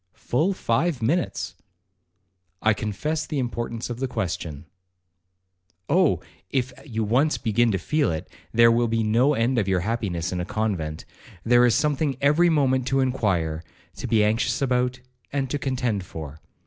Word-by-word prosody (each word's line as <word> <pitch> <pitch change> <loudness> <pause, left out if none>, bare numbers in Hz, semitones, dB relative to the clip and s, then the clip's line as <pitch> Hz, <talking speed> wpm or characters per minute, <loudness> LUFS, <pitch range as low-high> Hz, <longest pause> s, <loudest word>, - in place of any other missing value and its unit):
'Full 160 +11 0
five 135 -2 0
minutes.' 145 - 0 1.1
'I 110 - +5
confess 110 +10 -3
the 155 - -3
importance 120 -2 -3
of 120 0 -6
the 135 - -1
question.' 85 - -4 1.2
'Oh! 180 +1 +3 0.3
if 130 -1 -1
you 115 -5 -3
once 130 +9 +2
begin 115 +2 +2
to 95 - +1
feel 145 - 0
it, 80 -1 -4 0.2
there 115 0 +6
will 120 +1 +2
be 115 0 0
no 120 +7 +3
end 120 +1 +1
of 100 - -1
your 95 -2 +1
happiness 90 -5 -2
in 90 -1 -2
a - - -1
convent. 90 -6 -2 0.4
There 120 +1 +5
is 115 - +3
something 145 -2 +1
every 150 +5 +4
moment 130 -5 +2
to 135 0 +2
inquire, 95 -12 0 0.3
to - - -4
be 110 -2 +3
anxious 115 +3 +1
about, 125 -1 0 0.3
and 135 -2 -2
to 145 - -1
contend 125 -7 -1
for. 80 -4 -8
120 Hz, 160 wpm, -24 LUFS, 105-135 Hz, 1.2 s, there